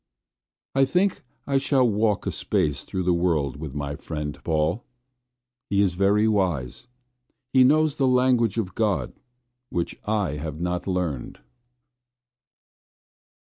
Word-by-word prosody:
I 135 0 +4
think 180 +7 +1 0.2
I 140 -1 +2
shall 135 -2 +3
walk 105 -1 +1
a - - -1
space 75 -2 -1
through 95 - -3
the 90 0 +2
world 80 -6 0
with 75 -2 -7
my 70 0 -3
friend 75 -1 -5
Paul. 80 +7 0 0.9
He 100 - +1
is 95 -3 +1
very 100 +4 +3
wise, 90 - -1 0.7
he 130 -1 +7
knows 155 +2 +3
the 135 - +2
language 125 -4 +3
of 100 -5 -2
God 105 -3 0 0.6
which 85 -1 -2
I 105 -8 -1
have 75 0 -5
not 90 +1 -2
learned. 90 -8 -3
95 Hz, 130 wpm, -24 LUFS, 80-120 Hz, 0.9 s, he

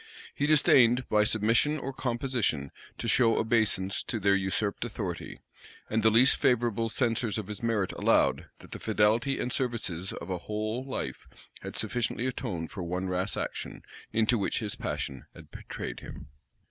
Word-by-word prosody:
He 145 - 0
disdained, 125 -5 +5
by 105 0 +4
submission 115 +8 +2
or 135 -1 -5
composition, 120 - -1 0.3
to - - -4
show 115 0 +4
obeisance 110 -4 +1
to 115 - -2
their 100 0 +3
usurped 100 +2 0
authority; 100 -7 -5 0.5
and 110 +1 +2
the 110 - +5
least 120 +5 +5
favorable 115 -2 +1
censors 115 -2 0
of 110 - -3
his 105 0 -6
merit 110 -5 0
allowed, - - +2
that - - -15
the - - -6
fidelity 110 +5 +2
and 125 - -2
services 105 -8 -1
of 85 - -7
a 90 - -2
whole 110 +6 -3
life 135 - -5 0.3
had - - -7
sufficiently 120 0 -1
atoned 105 -11 -3
for 95 - -6
one 90 +2 -3
rash 90 +2 -1
action, - - -5 0.3
into 115 +1 +2
which 100 - -1
his 105 -2 -2
passion 65 - -4
had - - -14
betrayed - - -6
him. - - -10
110 Hz, 160 wpm, -29 LUFS, 100-120 Hz, 0.5 s, disdained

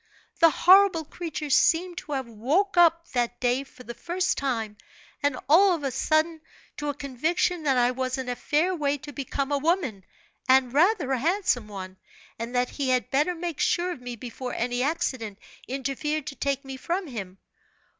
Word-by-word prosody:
The 330 - +7
horrible 370 -1 +5
creature 310 -2 -5
seemed 350 +5 +3
to 300 - -7
have 265 -3 -2
woke 285 - 0
up 335 -1 +4
that 240 -1 -1
day, 250 +2 +1
for 260 -2 -16
the 235 - -7
first 355 +8 -1
time, 225 -6 -2 0.4
and 285 -2 +1
all 360 +5 +6
of 310 - -7
a 275 - -1
sudden, 315 +3 +1 0.4
to 295 - -3
a 285 - -2
conviction 310 +6 -1
that 275 -4 +1
I 245 0 +3
was 255 +1 -2
in 260 -1 -4
a 245 - -2
fair 310 +8 +1
way 290 -3 0
to 290 +1 -10
become 275 +1 -3
a 285 - +1
woman, 290 - 0 0.5
and 260 -1 +4
rather 330 -2 +3
a 260 - +1
handsome 320 - +1
one, 190 -2 -8 0.4
and 235 +2 -5
that 245 0 +1
he 275 -2 -2
had 255 -1 +1
better 300 +6 +2
make 340 -3 -5
sure 355 +1 +1
of 265 - -7
me 245 -1 -6
before 250 +2 -6
any 245 +1 -1
accident 255 -8 -2 0.3
interfered 275 +3 -2
to 295 - -6
take 275 0 -2
me 270 0 -7
from 355 +8 -2
him. 200 - -7
280 Hz, 185 wpm, -26 LUFS, 250-330 Hz, 0.5 s, The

